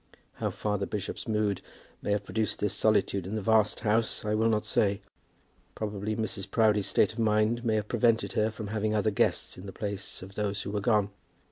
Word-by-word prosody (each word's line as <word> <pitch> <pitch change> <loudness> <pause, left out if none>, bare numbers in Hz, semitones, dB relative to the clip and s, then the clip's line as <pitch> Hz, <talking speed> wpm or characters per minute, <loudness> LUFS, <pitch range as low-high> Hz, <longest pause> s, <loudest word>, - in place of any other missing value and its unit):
How - - -1
far 105 -1 -2
the 100 - -2
bishop's 105 +3 -4
mood 105 -3 0 0.4
may - - -4
have 105 0 0
produced 110 +2 -1
this 105 - -1
solitude 100 -3 +2
in 105 - -3
the 110 - -1
vast 110 0 +3
house 110 0 +1
I 105 - 0
will 110 +1 +3
not 110 -1 +1
say. 100 -1 +2 0.8
Probably 105 0 -3
Mrs. 105 -3 -3
Proudie's 105 -2 +3
state 100 - +3
of 115 - -8
mind 110 +2 +2
may 110 -2 +1
have 105 -1 -1
prevented 115 0 +2
her 110 +1 +2
from 105 -1 -6
having 110 0 0
other 105 0 +2
guests 100 - 0
in 95 - -9
the - - -6
place 100 -1 -5
of 95 +1 -10
those 100 -1 -2
who 100 - -4
were 105 0 -1
gone. 105 -2 +2
105 Hz, 210 wpm, -29 LUFS, 100-110 Hz, 0.8 s, vast